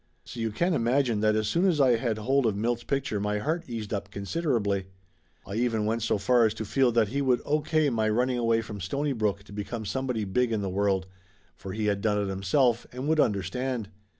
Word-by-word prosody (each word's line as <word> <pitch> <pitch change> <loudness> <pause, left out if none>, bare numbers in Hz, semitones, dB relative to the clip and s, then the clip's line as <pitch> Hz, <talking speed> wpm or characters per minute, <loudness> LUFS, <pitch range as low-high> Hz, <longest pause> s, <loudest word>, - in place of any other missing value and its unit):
So 120 - -9
you 115 -1 0
can 170 - 0
imagine 120 -3 +1
that 110 0 +3
as 110 -1 0
soon 170 +8 +1
as 175 -6 +2
I 130 -3 +5
had 115 -2 -1
hold 130 +3 +2
of 105 - 0
Milt's 120 +3 -1
picture 135 -6 -1
my 105 +1 -1
heart 160 +9 -2
eased 110 -3 -5
up 100 -1 -3
considerably. 100 - -1 0.6
I 100 - -7
even 115 -3 +1
went 115 +2 0
so 110 - +1
far 120 +3 +4
as 110 - -4
to 110 - -4
feel 130 +3 +2
that 115 -3 +3
he 140 +5 -1
would 130 -3 +2
O.K. 155 +1 +1
my 110 -2 +1
running 125 +3 +1
away 115 -1 +2
from 105 -2 -7
Stonybrook 110 - -1
to 100 - -14
become 110 +2 -5
somebody 125 -1 -2
big 120 +5 +1
in 110 -3 -1
the 95 - -2
world, 95 -1 +1 0.5
for 95 0 -8
he 110 +1 -2
had 100 -1 0
done 105 -1 +1
it 100 -1 -1
himself 115 +6 +1
and 130 +3 -5
would 160 0 +2
under 100 -8 +2
stand. 125 +2 -3
115 Hz, 225 wpm, -27 LUFS, 105-130 Hz, 0.6 s, I